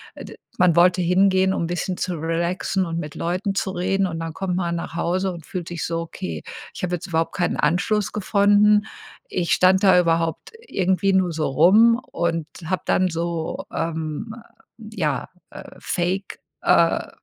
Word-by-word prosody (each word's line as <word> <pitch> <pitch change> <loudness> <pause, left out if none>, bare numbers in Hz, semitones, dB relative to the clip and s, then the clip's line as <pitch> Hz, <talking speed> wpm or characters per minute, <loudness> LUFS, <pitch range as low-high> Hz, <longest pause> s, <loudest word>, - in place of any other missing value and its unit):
äh, - - -9
d - - -11 0.2
man 175 -3 +4
wollte 180 +1 +4
hingehen, 190 +1 +3
um 170 - -1
bisschen 175 +1 -3
zu 180 -1 -2
relaxen 170 +3 -1
und 165 0 -3
mit 150 -2 -7
Leuten 185 +4 -2
zu 190 - -1
reden 190 +2 0
und 165 -2 -5
dann 165 -1 -5
kommt 180 +1 -3
man 170 -2 -1
nach 170 -1 -6
Hause 185 +3 0
und 165 -3 -10
fühlt 180 -3 -5
sich 170 -3 -4
so: 165 0 -2
„Okay, 85 - -6 0.3
ich - - -8
habe 180 0 -1
jetzt 175 - -8
überhaupt 165 -1 -1
keinen 175 - 0
Anschluss 180 +7 +1
gefunden.“ 210 +1 +3 0.4
Ich 175 -2 -2
stand 190 +2 +4
da 185 -2 +6
überhaupt 165 - 0 0.2
irgendwie 190 +1 +1
nur 185 -2 +2
so 155 -1 -1
rum 205 - +5
und 165 -2 -1 0.2
habe 185 +2 -2
dann 185 0 +2
so, 165 -1 -3
ähm, 160 +6 -4 0.4
äh, - - -12
ja, 150 -7 -1 0.2
äh, - - -11
fake, 185 +3 -3 0.2
äh, - - +3
175 Hz, 175 wpm, -22 LUFS, 165-190 Hz, 0.4 s, da